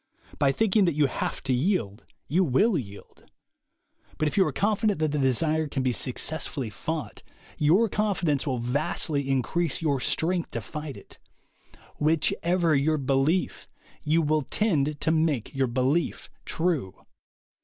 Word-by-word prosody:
By 140 -2 +4
think 220 +6 0
ing 210 -3 +5
that 170 -4 0
you 150 -1 +3
have 135 - -3
to 130 - 0
yield, 125 - -1 0.2
you 180 +5 +2
will 185 - +2
yield. 100 -9 -7 0.9
But 155 - +1
if - - -2
you 195 - +5
are - - -1
confident 210 0 +1
that 155 -1 0
the 150 - -1
desire 155 +4 +2
can 135 -2 -3
be 130 - +1
success 135 +6 0
fully 130 -7 -5
fought, 160 +9 -5 0.4
your 175 +10 +4
confidence 180 -9 0
will 130 -2 0
vastly 140 +3 -1
increase 135 +4 0
your 145 -4 0
strength 170 +6 0
to - - -3
fight 150 +6 -7
it. - - -15 0.8
Whichever 165 +2 +1
your 155 +3 +2
belief, 140 +6 0 0.3
you 160 +2 +2
will 155 +1 +1
tend 150 -4 0
to 160 - +2
make 155 -7 0
your 135 -1 +1
belief 130 +7 -1
true. 160 - -1
150 Hz, 155 wpm, -26 LUFS, 135-170 Hz, 0.9 s, ing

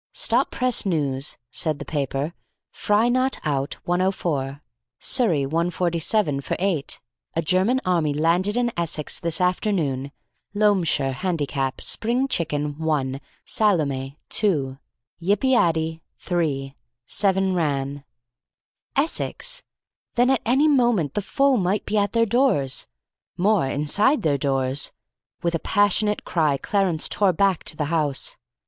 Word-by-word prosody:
"Stop 245 +4 +2
press 250 -2 +1
news," 145 -7 -1
said 155 +1 -1
the - - -7
paper. 145 +1 -2 0.4
"Fry 210 +3 +2
not 255 +2 +1
out, 140 -2 -1
104. 170 -6 -1 0.4
Surrey 175 - +2
147 170 0 0
for - - -3
8. 175 -7 -1 0.4
A 165 - +1
German 190 +10 +2
army 170 -5 +1
landed 170 +8 +1
in 240 -1 +1
Essex 160 -3 0
this 170 -1 0
afternoon. 175 - 0 0.4
Loamshire 185 -10 +2
Handicap: 145 -5 -2
Spring 245 +4 0
Chicken, 150 - -2
1; 140 -4 -1 0.2
Salome, 145 -10 +1
2; 140 -11 +1 0.4
Yip 200 +7 +1
i 260 - +3
addy, 160 -6 +1 0.2
3. 145 -6 -2 0.3
Seven 190 - +2
ran." 140 -4 -1 0.9
Essex! - - -1 0.5
Then 245 +2 +4
at 265 - +1
any 265 +6 +3
moment 240 - +2
the 205 - -1
foe 275 +5 +2
might 190 +1 0
be 215 - -2
at 205 0 0
their 230 0 +3
doors; 230 - +1 0.5
more, 190 -5 +2
inside 205 - +2
their 145 -3 +1
doors. 135 0 0 0.5
With 170 0 0
a 165 - 0
passionate 205 +2 +1
cry, 155 -5 +1
Clarence 190 -2 +1
tore 200 -3 +3
back 195 0 +1
to 155 - 0
the 150 - -1
house. 150 -4 0
170 Hz, 130 wpm, -23 LUFS, 145-210 Hz, 0.9 s, Then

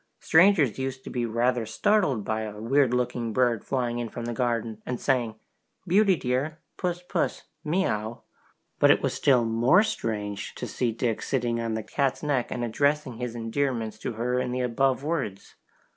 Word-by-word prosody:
Strangers 160 - +4
used 130 0 -4
to - - -8
be 120 -2 -1
rather 120 +1 +1
startled 135 - +1
by 110 0 -1
a 105 -1 -6
weird 130 +3 +2
looking 125 -2 -1
bird 120 -3 +2
flying 120 -3 -1
in 120 -1 -3
from 120 +2 -6
the 120 - -3
garden, 115 -2 -1
and 125 -1 -4
saying, 120 -5 0 0.5
"Beauty 195 +1 +4
dear, 135 +3 -1 0.2
puss, 180 -1 -3
puss, - - -1 0.2
miaow!" 120 - -1 0.6
But - - +6
it - - +4
was - - 0
still 125 -4 +3
more 120 - +4
strange 105 - -3
to - - -5
see 120 -2 -1
Dick 115 0 -1
sitting 120 -3 -1
on 115 -1 -2
the 110 - -3
cat's 135 +4 -1
back 140 -5 0
and 120 - -3
addressing 140 +1 0
his 120 -1 -4
endearments 115 -2 -2
to 115 - -4
her 125 +3 -1
in 125 -1 -2
the 125 +1 -1
above 130 +2 +1
words. 145 - -3
125 Hz, 175 wpm, -26 LUFS, 115-140 Hz, 0.6 s, But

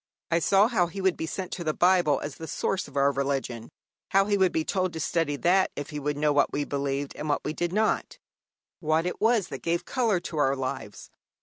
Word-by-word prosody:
I 165 - +3
saw 195 +5 +4
how 190 -8 +2
he 175 +4 -8
would 190 -2 +2
be 160 - -4
sent 185 +2 -5
to 175 - -4
the 155 -2 -1
Bible 175 -6 +3
as 145 - -6
the 160 - -7
source 190 +3 -2
of 140 - -9
our 140 0 +4
religion, 135 -4 -2 0.4
how 195 0 +4
he 205 0 +1
would 190 -2 +3
be 160 - -1
told 185 -3 -1
to 160 - -5
study 160 -3 0
that 185 +6 +3
if 145 +1 -6
he 150 - -4
would 145 0 -2
know 150 0 +2
what 145 -1 +3
we 145 - -1
believed 140 0 -3
and 150 - -5
what 145 - 0
we 150 - -1
did 175 +1 -2
not 215 +3 0 0.6
what 155 +1 +1
it 180 - -4
was 220 -3 +3
that 135 - -6
gave 170 +1 -1
colour 230 -8 +1
to 170 -2 -6
our 135 -1 +3
lives. 130 -1 -5
160 Hz, 235 wpm, -27 LUFS, 145-185 Hz, 0.6 s, saw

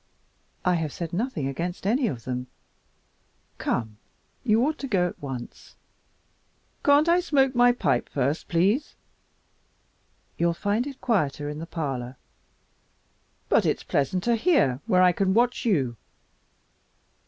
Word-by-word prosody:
"I 180 - +4
have 160 -4 -1
said 170 +1 -6
nothing 225 - -2
against 170 +7 -4
any 240 +5 +2
of 120 - -5
them. 125 0 -4 1.1
Come, 110 -3 -2 0.5
you 230 +1 +3
ought 310 +1 -2
to 275 - -4
go 190 -7 +2
at - - -9
once." 130 -4 -8 1.1
"Can't 290 +2 +5
I 345 +1 +5
smoke 275 -6 +2
my 245 0 +5
pipe 130 - 0
first 140 +3 -1
please?" 200 - +1 1.4
"You'll 170 0 +2
find 210 +7 -1
it 275 -2 -9
quieter 150 - 0
in 150 +1 -6
the 165 - -6
parlor." 135 -7 -4 1.3
"But - - +3
it's - - 0
pleasanter 185 - 0
here 225 - +2
where 185 0 +4
I 180 - +6
can 190 +2 0
watch 245 +2 +2
you." 135 - +1
180 Hz, 130 wpm, -25 LUFS, -, 1.4 s, I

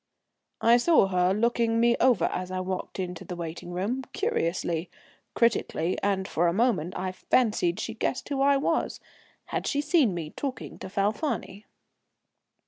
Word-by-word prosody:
I 235 +1 +6
saw 305 - +4
her 180 -1 +2
looking 230 +2 +1
me 235 0 +4
over 250 -4 +4
as 180 0 -3
I 185 0 -3
walked 185 0 -4
into 180 -2 -4
the 180 - -6
waiting 170 0 -6
room, 205 +9 -2
curiously, 175 - -1 0.5
critically, 190 -7 +1
and 195 -1 0
for 175 +2 +1
a 170 - +2
moment 195 -6 +1
I 185 0 -2
fancied 185 -3 +1
she 225 - -3
guessed 240 +3 -2
who 275 -2 -1
I 280 0 +5
was. 275 - -1 0.5
Had - - -1
she 285 - 0
seen 290 - +3
me 160 -3 -5
talking 275 -3 -5
to - - -7
Falfani? 205 +1 -2
200 Hz, 155 wpm, -27 LUFS, 180-240 Hz, 0.5 s, I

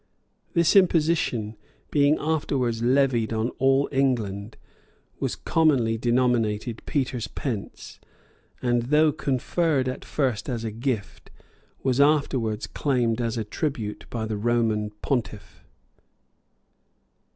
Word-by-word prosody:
This 170 +1 +3
imposition, 160 - +2 0.4
being 145 +1 +4
afterwards 135 -7 -1
levied 125 -2 +2
on 110 +1 0
all 135 +1 +3
England, 115 -6 -1 0.6
was - - -2
commonly 135 -9 +2
denominated 120 -2 0
Peter's 125 -5 -1
pence;[] 115 -6 -6 0.6
and 120 -1 +2
though 150 +1 +5
conferred 140 +1 0
at 130 - -4
first 130 -5 -1
as 120 -3 -3
a 110 - -3
gift, 115 -2 -4 0.5
was 130 0 +2
afterwards 135 -7 +1
claimed 125 -5 0
as 115 0 -2
a 110 - -1
tribute 110 -1 -4
by 115 -2 -3
the 110 -1 -3
Roman 110 -1 +1
pontiff. 110 -7 -3
125 Hz, 105 wpm, -25 LUFS, 110-140 Hz, 0.6 s, though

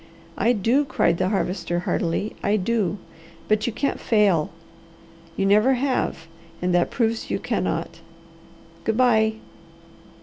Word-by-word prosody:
"I 235 +4 +2
do!" 235 +7 +2
cried 170 -10 +1
the 185 0 +1
Harvester 175 -3 -1
heartily. 175 +4 -1
"I 205 - +1
do! 205 -2 0 0.5
But 215 +1 +1
you - - 0
can't 275 +6 -2
fail. 200 -8 +2 0.9
You 195 - +1
never 215 +7 +4
have 255 -10 -1 0.3
and 180 0 0
that 175 -1 +2
proves 230 -1 -1
you - - 0
cannot! - - -2 0.8
Good 225 0 0
bye!" 220 -3 +4
210 Hz, 130 wpm, -23 LUFS, 180-235 Hz, 0.9 s, never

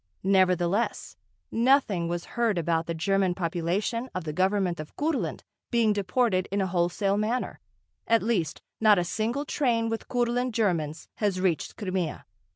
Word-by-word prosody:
Nevertheless, 185 +2 +1 0.4
nothing 230 -8 +3
was 175 0 -3
heard 230 -5 +1
about 165 0 0
the 170 - -2
German 190 +1 +1
population 185 +8 -1
of 185 - -2
the 155 -1 -4
Government 185 0 +1
of 155 0 -8
Kurland 305 0 -1 0.3
being 230 -3 +3
deported 200 -1 +1
in 200 - 0
a 190 - +2
wholesale 185 +3 +1
manner, 225 +4 -1 0.5
at 230 0 +3
least, 185 -9 -1 0.2
not 215 -2 +6
a 175 - +2
single 225 +10 -2
train 235 -6 +1
with 225 0 -4
Kurland 245 0 0
Germans 170 -8 -1
has 200 -4 0
reached 185 -4 -1
Crimea. 185 -5 -3
195 Hz, 150 wpm, -27 LUFS, 175-230 Hz, 0.5 s, not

